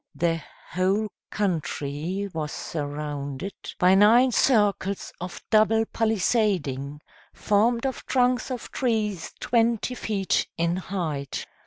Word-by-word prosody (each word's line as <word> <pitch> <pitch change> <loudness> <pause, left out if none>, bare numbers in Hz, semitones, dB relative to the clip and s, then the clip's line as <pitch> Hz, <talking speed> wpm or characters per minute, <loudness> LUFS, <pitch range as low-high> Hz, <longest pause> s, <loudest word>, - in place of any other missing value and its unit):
The 165 -1 0 0.3
whole 195 +4 +1 0.2
country 175 -1 -2
was 155 -2 -3
surrounded 145 +2 -4 0.2
by 180 +1 +5
nine 230 +6 +6
circles 205 -5 +2
of 180 0 -7
double 220 0 +4
palisading, 190 - 0 0.3
formed 230 +4 +2
of 265 -2 -3
trunks 250 -1 +2
of 250 -3 -5
trees 215 -8 -1
twenty 235 0 +1
feet 205 -5 0
in 170 +1 +1
height. 160 -8 -3
195 Hz, 105 wpm, -25 LUFS, 165-225 Hz, 0.3 s, nine